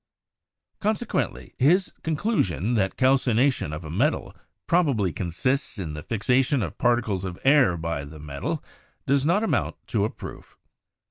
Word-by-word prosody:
Consequently, 215 +2 -2
his 175 +9 +4
conclusion 140 - 0
that 95 -5 0
calcination 130 - +2
of 75 +2 -6
a 75 - -6
metal 130 - 0 0.3
probably 135 - +2
consists 130 - -1
in 85 -6 -4
the 75 - -6
fixation 125 - +1
of 85 - -6
particles 115 -6 +1
of 90 -2 -5
air 135 -11 +5
by 80 -3 -3
the 75 +2 -10
metal, 70 -2 -4 0.4
does 140 +1 +2
not 195 +6 +3
amount 225 - 0
to - - 0
a - - +1
proof. - - -10
120 Hz, 140 wpm, -25 LUFS, 85-140 Hz, 0.4 s, air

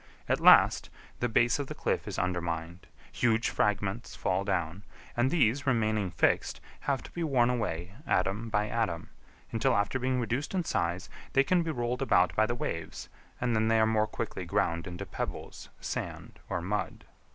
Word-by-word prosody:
At - - +1
last - - +6 0.3
the 120 - 0
base 120 +3 +3
of 140 - -3
the - - -6
cliff - - -1
is - - -4
undermined, 85 -1 -3 0.2
huge 115 -1 +2
fragments 105 +2 -1
fall 95 +1 0
down, 95 -2 -1 0.3
and 120 +2 +2
these 140 -3 +2
remaining 110 -5 +1
fixed, 80 - +1 0.2
have 140 -2 -1
to - - -11
be 170 - -3
worn 125 -6 +3
away 95 -7 -3
atom 100 +5 0
by 105 -1 +1
atom, 100 -8 -2 0.4
until 115 +3 +2
after 105 +6 0
being 130 0 0
reduced 125 +8 -2
in 180 - +1
size 90 - -1 0.3
they 135 - +5
can 180 +5 +2
be 165 - -3
rolled 125 -3 -2
about 90 -10 +3
by 110 +4 +3
the 120 - -1
waves, 80 -8 -5 0.3
and 120 -2 0
then 110 0 +2
they 115 0 +4
are 110 - +5
more 110 -1 +2
quickly 110 -5 -4
ground 85 0 0
into 90 -1 -6
pebbles, - - -6
sand, - - -5
or - - -1
mud. 100 +4 -3
110 Hz, 175 wpm, -30 LUFS, 90-125 Hz, 0.4 s, last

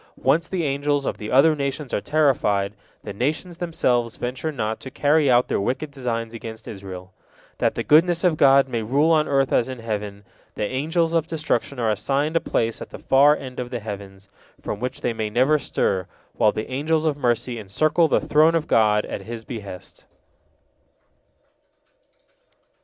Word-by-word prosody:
Once 165 +1 +2
the 185 -3 -2
angels 145 0 0
of - - -3
the 105 -1 -6
other 155 +5 +5
nations 140 -1 -4
are - - 0
terrified, 115 -10 +1 0.3
the - - -6
nations 155 - -2
themselves 125 -9 0
venture 130 +6 -3
not 110 -5 -3
to 130 - -8
carry 145 +2 +2
out 125 0 +4
their - - -1
wicked 130 +8 -2
designs 115 -4 -4
against 115 -1 -8
Israel. 95 -2 -9 0.5
That - - +1
the - - -2
goodness 170 +3 +4
of 175 -3 +3
God 135 -2 +5
may 120 -3 -2
rule 140 +9 +2
on 155 -1 +3
earth 135 -1 +1
as 120 - +2
in 130 - -5
heaven, 105 -3 -5 0.3
the 105 - -1
Angels 160 - 0
of 165 -2 +1
Destruction 150 -3 -2
are 115 -3 +1
assigned 140 +9 -1
a - - +5
place 115 -6 -1
at - - -7
the - - -9
far 145 +3 +4
end 130 -2 -8
of 125 -1 -4
the 120 -1 -4
heavens, 100 -2 -8 0.3
from 105 - -5
which 125 +2 -4
they 120 - -1
may 110 -1 -3
never 130 +7 +3
stir, 95 -8 -1 0.3
while - - +3
the 110 - -5
Angels 155 +4 0
of 155 -2 +1
Mercy 120 -3 -1
encircle 155 - +2
the - - +2
Throne 155 +2 +3
of 165 -1 0
God, 105 -4 +3
at - - -5
His 115 -1 -8
behest. 100 -6 -9
130 Hz, 180 wpm, -23 LUFS, 110-150 Hz, 0.5 s, other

